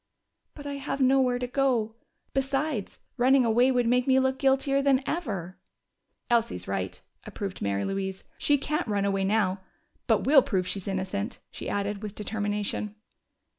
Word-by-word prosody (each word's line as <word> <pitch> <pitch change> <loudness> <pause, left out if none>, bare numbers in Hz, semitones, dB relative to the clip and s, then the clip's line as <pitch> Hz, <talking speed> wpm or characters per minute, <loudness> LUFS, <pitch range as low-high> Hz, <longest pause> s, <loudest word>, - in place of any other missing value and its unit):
"But 290 - -10
I 285 0 -4
have 275 0 -4
nowhere 260 -1 +3
to 250 - -2
go. 245 -4 +1 0.4
Besides, 270 -4 -1 0.2
running 255 +1 +5
away 240 +3 +4
would 245 -2 +2
make 250 +2 +2
me 265 0 +5
look 265 0 +1
guiltier 275 0 +2
than 275 -1 +3
ever." 195 - -3 0.7
"Elsie's 235 -1 0
right," - - -3 0.3
approved 195 -3 -6
Mary 100 0 0
Louise. 190 -1 -3 0.2
"She 290 - +3
can't 305 +3 -2
run 200 -2 0
away 195 -1 +1
now. 195 -2 +1 0.5
But - - +3
we'll 275 0 +7
prove 190 -6 -1
she's 190 +1 -3
innocent!" 200 +4 -2
she - - -6
added, 205 0 -2
with 210 -1 -6
determination. 210 0 -3
235 Hz, 155 wpm, -27 LUFS, 200-270 Hz, 0.7 s, we'll